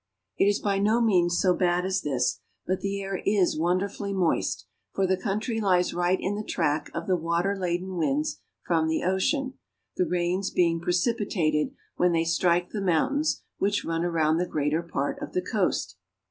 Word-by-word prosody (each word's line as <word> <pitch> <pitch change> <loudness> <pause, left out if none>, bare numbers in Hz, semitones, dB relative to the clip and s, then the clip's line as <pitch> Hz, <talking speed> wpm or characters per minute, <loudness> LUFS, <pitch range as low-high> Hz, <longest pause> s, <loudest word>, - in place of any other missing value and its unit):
It - - +3
is 205 0 +3
by 200 -1 0
no 215 +4 +3
means 180 -6 +3
so 185 -2 +3
bad 180 0 +1
as 190 0 0
this, 130 -4 0 0.3
but 185 0 -1
the 200 0 -2
air 195 -1 -4
is 200 -3 +2
wonder 180 +5 +1
fully 200 0 -5
moist, 180 -4 0 0.3
for 195 - +2
the 190 0 +2
country 215 +4 -2
lies 180 -3 +2
right 175 +1 +1
in 195 - -1
the 210 +1 -3
track 150 -6 -1
of - - -3
the 185 - +2
water 170 +4 0
laden 180 0 -2
winds 150 -1 0 0.3
from 160 -2 +1
the 160 - 0
ocean, 260 - 0 0.4
the 180 - +2
rains 180 +2 0
being 170 -2 +1
precipi 200 +6 0
tated 155 -5 0 0.2
when 180 -1 +3
they 165 0 +2
strike 175 +1 +1
the 210 - -3
mountains 275 - +1 0.2
which 205 +1 0
run 165 0 -1
around 160 -2 +2
the 180 +1 0
greater 150 +2 0
part 150 -4 -3
of - - -6
the 180 - +1
coast. 180 - -1
180 Hz, 190 wpm, -26 LUFS, 170-195 Hz, 0.4 s, It